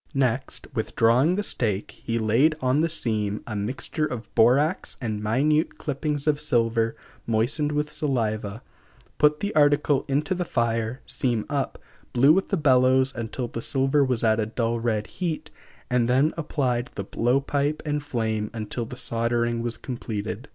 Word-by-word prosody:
Next, 130 0 0
withdrawing 120 +6 +2
the 205 - -1
stake, 105 - -1
he 115 - -1
laid 115 +8 +3
on 130 +2 +2
the 165 - +1
seam 110 -9 -1
a 110 - -5
mixture 130 +9 -2
of 115 -5 -7
borax 135 +9 +3
and 110 -5 -3
minute 145 +9 +1
clippings 145 0 -2
of 150 -1 +1
silver 115 -5 +1 0.3
moistened 120 +7 +1
with 150 0 -1
saliva, 110 -7 -2 0.6
put 150 0 +4
the 205 +1 -2
article 145 -1 +3
into 145 +6 0
the 180 -1 -1
fire, 115 -4 -1
seam 120 -4 -1
up, 140 -2 -1 0.4
blew 135 +5 +6
with 190 +3 +1
the 195 - +1
bellows 130 -2 +4
until 120 +1 -4
the 115 - -6
silver 135 +3 +2
was 125 -4 0
at 110 0 +3
a 105 - 0
dull 115 +1 -1
red 110 -2 0
heat, 165 - -4 0.4
and 125 -1 +1
then 135 +5 +3
applied 130 -6 -1
the 100 - -3
blow 120 +6 +1
pipe 145 +2 -1
and 150 -1 -1
flame 110 -5 -2
until 115 +2 -3
the 125 - -9
soldering 120 0 0
was 120 0 -3
completed. 110 -1 -5
125 Hz, 160 wpm, -25 LUFS, 115-145 Hz, 0.6 s, blew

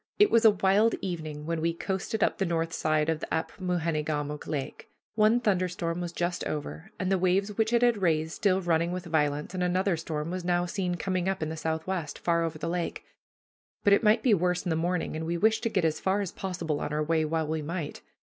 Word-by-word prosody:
It 415 - +5
was 230 0 +5
a - - +11
wild 205 +3 +3
evening 155 -5 -5
when 165 0 -2
we 165 0 0
coasted 195 +4 -2
up - - +1
the - - +2
north 165 -1 -1
side 155 -1 +1
of 160 -1 0
this - - -6
Apmoojenegamook 160 -4 -2
Lake. 140 -3 -5 0.2
One 215 +2 +4
thunder 195 -6 +1
storm 170 -1 -3
was 175 -1 -3
just 175 0 -2
over, 155 +5 -5
and 185 0 -1
the 190 - +3
waves 195 +3 +1
which 220 +1 +1
it 240 0 +3
had 235 -4 +3
raised 160 -3 +1
still 190 +1 +1
running 170 -1 +1
with 180 0 -4
violence, 150 -1 0
and 185 - -3
another 185 +1 +1
storm 160 0 -4
was 185 0 -3
now 175 0 +1
seen 180 0 -2
coming 185 0 -1
up 195 -4 -2
in 155 - -2
the 160 - -4
southwest, 160 +1 -3
far 170 -1 +1
over 165 -1 -3
the 165 - -4
lake; 170 0 -3 0.8
but 205 - +5
it - - +5
might 220 +1 +4
be 245 - +5
worse 180 -1 +1
in 175 - 0
the - - +2
morning, 175 0 -1
and 160 +1 -3
we 170 +1 -1
wished 220 +4 +3
to 230 - 0
get 185 -6 +1
as 155 -1 0
far 190 +2 +1
as 195 - -3
possible 175 -6 -3
on - - -3
our 150 0 0
way 160 +1 +1
while 160 +1 0
we 155 +1 -2
might. 160 0 -5
175 Hz, 235 wpm, -28 LUFS, 160-190 Hz, 0.8 s, a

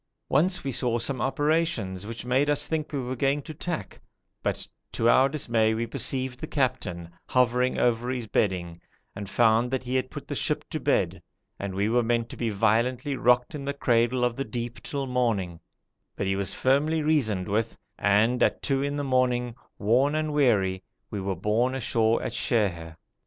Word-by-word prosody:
Once 180 +7 +2
we 135 - -2
saw 120 -1 +1
some 120 +1 -2
operations 135 - 0
which 115 +1 -6
made 130 +4 +2
us 145 0 +1
think 155 -1 -2
we 145 - -2
were 130 0 -3
going 135 +3 +1
to 155 +2 -8
tack, 170 +2 -5 0.4
but - - -2 0.2
to 115 - 0
our 130 +3 +5
dismay 115 -6 +1
we 115 +1 -1
perceived 130 +2 -2
the 155 - -5
captain 95 - -1 0.2
hovering 125 0 +2
over 120 0 +1
his 125 -2 -2
bedding, 90 -5 0 0.4
and 100 -1 -6
found 115 +2 +3
that 130 0 -2
he 125 0 -4
had 130 0 0
put 145 - -8
the - - -4
ship 150 +2 -1
to 155 - -2
bed, 95 - 0 0.4
and 100 -1 -4
we 100 +2 +1
were 120 +2 +3
meant 115 0 0
to - - -8
be 115 - -1
violently 115 +6 +1
rocked 125 -1 +3
in 145 -2 -5
the 140 +1 -3
cradle 120 -1 +2
of 120 -1 +1
the 135 - -2
deep 120 0 -5
till 140 +4 -3
morning; 115 -10 -1 0.6
but - - -2
he 95 0 +1
was 100 0 -1
firmly 150 +4 +1
reasoned 110 - +1
with, 110 +2 -1 0.2
and 110 +5 +3
at - - +2
two 135 -1 +1
in 145 +1 -1
the 145 - -2
morning, 125 -2 +1 0.2
worn 130 +8 +2
and 155 -1 -1
weary, 100 -10 +2 0.3
we 100 - -3
were 95 0 -2
borne 110 +8 +1
ashore 115 -3 +2
at - - -3
Sheher. 85 -8 -1
125 Hz, 190 wpm, -26 LUFS, 110-135 Hz, 0.6 s, our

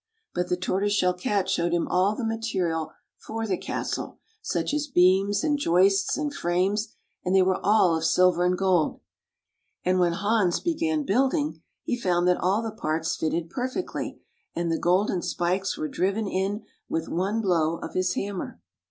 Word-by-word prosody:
But 180 0 -1
the 180 - +1
Tortoise 195 +3 0
Shell 180 -3 +2
Cat 190 +2 -1
showed 175 -3 0
him 175 - +1
all 190 +4 +2
the 235 - -3
material 190 -8 -1 0.3
for 225 0 -4
the 195 -4 0
castle, - - -4 0.2
such - - -2
as 300 0 -1
beams, 195 -2 +3
and 295 -2 +1
joists, 195 -2 +3
and 295 -1 -2
frames, 195 +3 0 0.3
and 180 +1 +1
they 190 - +6
were 185 0 +1
all 200 -5 +4
of 160 - -2
silver 180 +2 +3
and 180 0 +2
gold. 185 -4 +1 0.9
And 185 0 +2
when 175 -1 +3
Hans 200 -1 +1
began 320 -2 0
building, 270 - +1 0.2
he - - -1
found 175 -2 +2
that 180 - +2
all 195 +5 +1
the 225 - -3
parts 160 -5 -2
fitted 165 +1 -2
perfectly, 260 +8 -4 0.4
and 170 0 -1
the 165 - 0
golden 180 +1 +2
spikes 185 +4 -1
were 155 - -2
driven 195 +6 -1
in 195 +3 -1 0.3
with 165 0 -2
one 195 +6 -1
blow 170 -5 +1
of - - -7
his 185 0 0
hammer. 200 -2 -4
190 Hz, 170 wpm, -26 LUFS, 175-215 Hz, 0.9 s, they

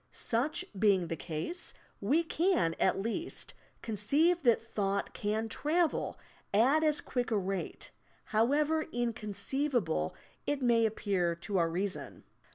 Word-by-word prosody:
Such 275 +10 -1
being 190 -5 +3
the 165 - -4
ease, 245 - -4 0.3
we 325 +4 +3
can 335 - +2
at 190 - +3
least 230 - -3 0.3
conceive 280 - +2
that 240 -5 +4
thought 200 -3 -2
can 215 +2 -1
travel 315 +8 0 0.3
at 265 +10 +4
as 305 -1 +2
quick 245 -1 -2
a 220 - +2
rate, 195 -1 -3 0.4
however 295 +8 +3
inconceivable 235 - -1 0.3
it 290 -1 +1
may 235 -3 +4
appear 195 -5 0
to 185 +3 -1
our 165 -1 +2
reason. 190 +3 -3
225 Hz, 125 wpm, -32 LUFS, 195-290 Hz, 0.4 s, that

